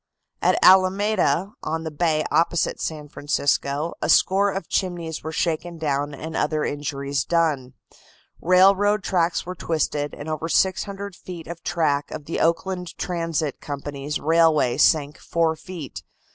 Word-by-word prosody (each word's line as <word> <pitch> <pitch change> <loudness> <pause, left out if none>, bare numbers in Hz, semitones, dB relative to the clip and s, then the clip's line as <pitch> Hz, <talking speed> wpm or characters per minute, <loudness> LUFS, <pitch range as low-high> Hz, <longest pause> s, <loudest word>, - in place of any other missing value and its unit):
At - - +3
Alameda, 190 -1 +4
on 160 0 -3
the 160 - -4
bay 155 0 +1
opposite 170 0 +1
San 150 -2 -4
Francisco, 145 +1 -1
a - - -1
score 200 +2 +4
of 195 0 -4
chimneys 170 -4 -2
were 160 - -5
shaken 170 +1 -2
down 145 -2 -1
and 160 +3 -7
other 150 0 0
injuries 140 -1 -2
done. 150 -7 0 0.7
Railroad 195 +3 +4
tracks 175 -3 0
were 180 - -5
twisted, 155 -4 -2
and 145 - -8
over 155 +1 -3
600 195 +2 0
feet 175 -3 -9
of 170 0 -8
track 150 -5 0
of 145 - -7
the 165 - -3
Oakland 180 +1 -1
Transit 165 -4 -2
Company's 145 0 -5
railway 160 -5 +3
sank 150 -1 +3
four 165 -1 0
feet. 160 -4 -8
165 Hz, 140 wpm, -23 LUFS, 150-180 Hz, 0.7 s, Alameda